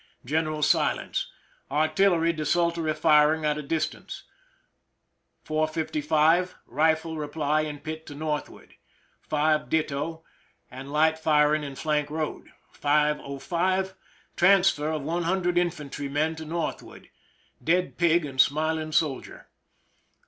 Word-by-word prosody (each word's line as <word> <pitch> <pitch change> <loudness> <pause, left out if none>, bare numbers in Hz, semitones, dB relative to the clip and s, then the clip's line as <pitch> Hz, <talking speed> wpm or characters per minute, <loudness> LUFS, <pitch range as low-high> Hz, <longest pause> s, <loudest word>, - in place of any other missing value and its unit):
General 155 +2 -1
silence. - - +1 0.4
Artil 155 +7 +3
lery 165 0 +1
desultory 165 +1 0
firing 155 0 +4
at 150 0 0
a - - -3
distance. 155 +2 -4 1.2
4: 155 0 0
55, 155 +3 +1
rifle 160 +4 0
reply 150 0 0
in 150 -1 -4
pit 155 +2 -7
to 145 - -8
northward. 150 0 -5 0.5
5, 155 0 0
ditto, 160 +1 -2 0.5
and 130 +2 -9
light 160 +2 +2
firing 150 -1 +3
in 140 -2 -6
flank 150 0 -1
road. 155 0 -4 0.2
5: 150 +1 +1 0.2
05, 185 +2 0 0.4
transfer 180 -5 +4
of 155 -3 -3
100 175 +3 0
infantrymen 150 -2 -2
to 160 0 -8
northward. 165 +1 -5 0.5
Dead 180 +3 0
pig 170 -1 +3
and 135 -2 +3
smiling 155 +3 0
soldier. 150 -3 -2
155 Hz, 110 wpm, -26 LUFS, 150-165 Hz, 1.2 s, firing